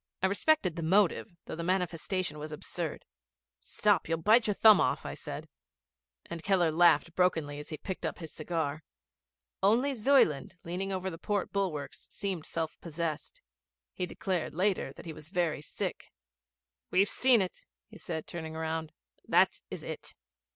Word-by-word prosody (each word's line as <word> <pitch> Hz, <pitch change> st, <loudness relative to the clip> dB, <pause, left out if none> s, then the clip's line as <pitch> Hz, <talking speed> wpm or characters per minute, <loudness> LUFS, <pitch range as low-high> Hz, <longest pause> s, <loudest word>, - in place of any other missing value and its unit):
I -, -, +6 dB
respected 200 Hz, -, +2 dB
the -, -, -2 dB
motive, 185 Hz, +2 st, +2 dB
though -, -, -5 dB
the 165 Hz, -, -4 dB
manifestation 180 Hz, -2 st, -1 dB
was 155 Hz, +1 st, -6 dB
absurd. 150 Hz, -, -4 dB, 0.5 s
'Stop, -, -, +1 dB
you'll 165 Hz, -, +2 dB
bite 215 Hz, +8 st, +5 dB
your 210 Hz, -, +1 dB
thumb 215 Hz, -2 st, +8 dB
off,' -, -, +1 dB
I -, -, -4 dB
said, -, -, -7 dB, 0.8 s
and 170 Hz, -, -6 dB
Keller 180 Hz, -3 st, +3 dB
laughed 165 Hz, -1 st, +4 dB
brokenly 160 Hz, -6 st, +1 dB
as 150 Hz, -, -8 dB
he 155 Hz, -, -5 dB
picked 190 Hz, +3 st, -6 dB
up -, -, -2 dB
his 160 Hz, -3 st, -8 dB
cigar. 155 Hz, -2 st, -2 dB, 0.8 s
Only 235 Hz, +8 st, +3 dB
Zuyland, 215 Hz, -, +3 dB
leaning 185 Hz, +3 st, -3 dB
over 190 Hz, 0 st, -2 dB
the 165 Hz, -, -8 dB
port 205 Hz, -1 st, -1 dB
bulwarks, 155 Hz, -9 st, -2 dB
seemed 190 Hz, -6 st, -3 dB
self 165 Hz, -1 st, -3 dB
possessed. 165 Hz, -1 st, -4 dB, 0.5 s
He 180 Hz, -, -2 dB
declared 180 Hz, -6 st, -2 dB
later 185 Hz, -5 st, +1 dB
that -, -, -12 dB
he 165 Hz, -, -5 dB
was 155 Hz, 0 st, -10 dB
very 175 Hz, -5 st, 0 dB
sick. -, -, -5 dB, 0.8 s
'We've 195 Hz, +2 st, +4 dB
seen 255 Hz, 0 st, +4 dB
it,' 185 Hz, -2 st, -3 dB, 0.2 s
he 215 Hz, -2 st, -14 dB
said, 160 Hz, -2 st, -4 dB
turning 160 Hz, -2 st, -6 dB
round. 160 Hz, 0 st, -3 dB, 0.3 s
'That -, -, +4 dB
is -, -, -6 dB
it.' -, -, -7 dB
175 Hz, 160 wpm, -31 LUFS, 160-195 Hz, 0.8 s, thumb